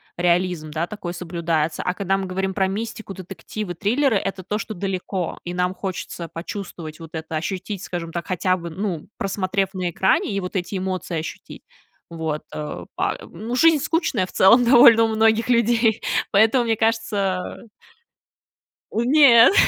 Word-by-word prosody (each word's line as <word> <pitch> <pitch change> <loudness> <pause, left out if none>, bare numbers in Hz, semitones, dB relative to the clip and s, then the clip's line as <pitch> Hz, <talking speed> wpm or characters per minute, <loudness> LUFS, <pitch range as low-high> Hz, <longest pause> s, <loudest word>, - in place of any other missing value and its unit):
Реализм, 175 -2 0
да, 165 +3 -2
такой 180 -5 -6
соблюдается. 165 -3 -2
А 180 - 0
когда 195 0 0
мы 195 - -3
говорим 190 +1 -2
про 190 0 +1
мистику, 215 +1 -5
детективы, 195 +1 -6
триллеры- 230 - +1
это 195 -1 -4
то, 210 +3 -2
что 220 - -5
далеко, 190 -1 -3
и 175 - -5
нам 180 +1 0
хочется 180 -3 -5
почувствовать 170 -3 -7
вот 165 - -9
это, 160 0 -5
ощутить, 190 +4 -4
скажем 170 -2 -5
так, 170 -1 -3
хотя 185 -1 +1
бы, 170 -1 -6
ну, 175 -2 -4
просмотрев 195 0 -1
на 185 -2 -2
экране, 190 +4 +1
и 195 - 0
вот 180 0 -6
эти 190 +2 -2
эмоции 185 -2 -3
ощутить, 160 - -8 0.5
вот, 160 -2 -3
э, 150 0 -5
па - - -1
ну, 220 +8 -5
жизнь 315 +1 +5
скучная, 325 - 0
в - - -13
целом, 230 +6 +6
довольно 235 -2 +8
у - - +3
многих 225 +1 +2
людей, 235 -2 +3 0.3
поэтому, 220 +5 +4
мне 225 -1 +2
кажется 220 -2 -1 1.2
У 225 - 0
нет. 255 -1 +7
190 Hz, 160 wpm, -22 LUFS, 175-220 Hz, 1.2 s, довольно